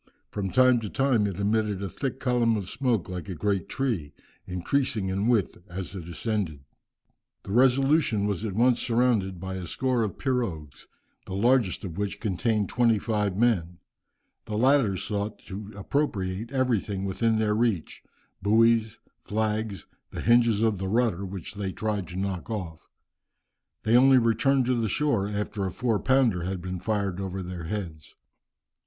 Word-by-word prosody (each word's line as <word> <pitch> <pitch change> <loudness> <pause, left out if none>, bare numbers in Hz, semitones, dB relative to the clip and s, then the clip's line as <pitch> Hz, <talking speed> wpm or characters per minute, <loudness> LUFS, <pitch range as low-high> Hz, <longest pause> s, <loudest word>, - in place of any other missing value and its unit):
From 100 -2 -2
time 130 +2 +5
to 110 -3 -5
time 130 -5 +2
it 100 -1 -5
emitted 105 -1 0
a - - -2
thick 130 +7 -4
column 120 -3 +2
of 100 -4 -4
smoke 120 -4 0
like 90 +1 -6
a 95 - -4
great 100 +2 -1
tree, 110 - -2 0.3
increasing 100 +3 -1
in 100 +3 0
width 115 -8 +1
as 90 0 -6
it 90 -4 -7
ascended." 90 -5 -2 0.8
The - - -8
Resolution 130 -2 +3
was 105 -1 -2
at 105 -4 -3
once 120 +2 +4
surrounded 115 -6 +1
by 95 +1 -5
a 90 -2 -6
score 130 +5 0
of 110 -3 -2
pirogues, 105 - -3 0.4
the 95 - -5
largest 115 -2 +2
of 90 +1 -6
which 100 0 -2
contained 105 0 0
twenty 115 -2 +3
five 105 -3 -1
men. 95 -7 +1 0.7
The 105 - -3
latter 125 -5 +3
sought 105 +2 -3
to 105 +1 -7
appropriate 100 -3 -2
everything 110 -7 0
within 110 +4 +1
their 110 -1 +1
reach, 110 -7 -1 0.4
buoys, 110 +2 +3 0.3
flags, 110 -3 -2 0.2
the - - -6
hinges 115 -2 +4
of 110 -4 +1
the 95 - -2
rudder, 105 -3 +1
which 95 -2 -7
they 100 -2 -3
tried 105 -3 -2
to 90 - -9
knock 95 -1 -3
off. 90 -8 -6 0.9
They 110 +2 +3
only 130 +1 +7
returned 125 +3 +3
to 125 - +2
the 115 -3 0
shore 115 -6 +1
after 105 0 -3
a - - -4
four 115 +2 0
pounder 130 -9 +2
had 95 +2 -3
been 90 +1 -5
fired 100 -2 -1
over 95 0 -4
their 90 -2 -6
heads. 85 -5 -6
105 Hz, 160 wpm, -27 LUFS, 95-120 Hz, 0.9 s, only